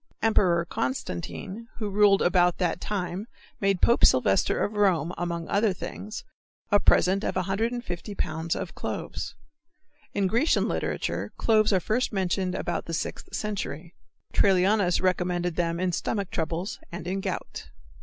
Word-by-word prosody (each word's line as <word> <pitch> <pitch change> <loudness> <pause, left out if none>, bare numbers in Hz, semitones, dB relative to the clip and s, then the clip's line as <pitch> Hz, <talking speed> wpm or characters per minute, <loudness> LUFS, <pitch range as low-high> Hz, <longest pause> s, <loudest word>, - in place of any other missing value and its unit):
Emperor 180 -6 +3
Constantine, 130 - -4
who 215 - -3
ruled 200 0 +4
about 175 -1 +3
that 180 -2 -1
time 190 0 -3 0.3
made 195 -2 +1
Pope 235 - +4
Sylvester 100 -7 +4
of 210 - -1
Rome, 180 -5 +2
among 170 -1 -3
other 205 0 +2
things, 210 +4 -7 0.5
a 205 - +6
present 195 +1 +4
of - - -1
150 200 +1 -2
pounds 160 0 -2
of - - -5
cloves. - - -5 0.8
In 200 - +2
Grecian 235 - +2
literature - - -2
cloves 215 -2 +3
are 190 - +4
first 220 +8 0
mentioned 185 -2 0
about - - -2
the 165 - -3
Sixth 135 - -5
century. 180 -6 -4 0.4
Trallianus 190 -1 +3
recommended 180 -2 0
them 170 -1 0
in 185 0 +1
stomach 200 +3 -2
troubles 165 +4 -3
and 170 -1 -6
in 190 +2 -2
gout. - - -5
185 Hz, 140 wpm, -27 LUFS, 170-205 Hz, 0.8 s, a